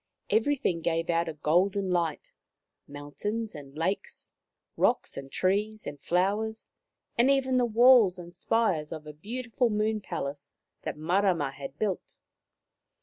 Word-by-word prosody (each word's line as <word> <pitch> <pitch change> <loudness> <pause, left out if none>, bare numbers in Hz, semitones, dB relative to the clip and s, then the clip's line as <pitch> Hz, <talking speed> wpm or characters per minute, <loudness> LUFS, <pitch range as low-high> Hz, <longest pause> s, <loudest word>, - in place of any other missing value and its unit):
Everything 220 -6 +1
gave 165 +1 0
out 170 0 +1
a - - -4
golden 185 +6 +1
light 170 -3 -1 0.3
— - - -57
mountains 205 +11 -4
and 145 -2 -11
lakes, 185 +5 -3 0.4
rocks - - +1
and 135 0 -8
trees 210 +3 0
and 145 -1 -7
flowers, 205 +5 0 0.5
and 245 +3 +5
even 265 -2 +2
the 250 - +3
walls 230 -4 +6
and 175 -1 -10
spires 180 -6 0
of 155 -1 -6
a 150 - -8
beautiful 235 - -2
moon 215 0 0
palace 145 -5 -5 0.3
that - - -5
Marama 170 -2 +1
had 135 0 -9
built. 200 -2 -3
185 Hz, 140 wpm, -28 LUFS, 155-220 Hz, 0.5 s, walls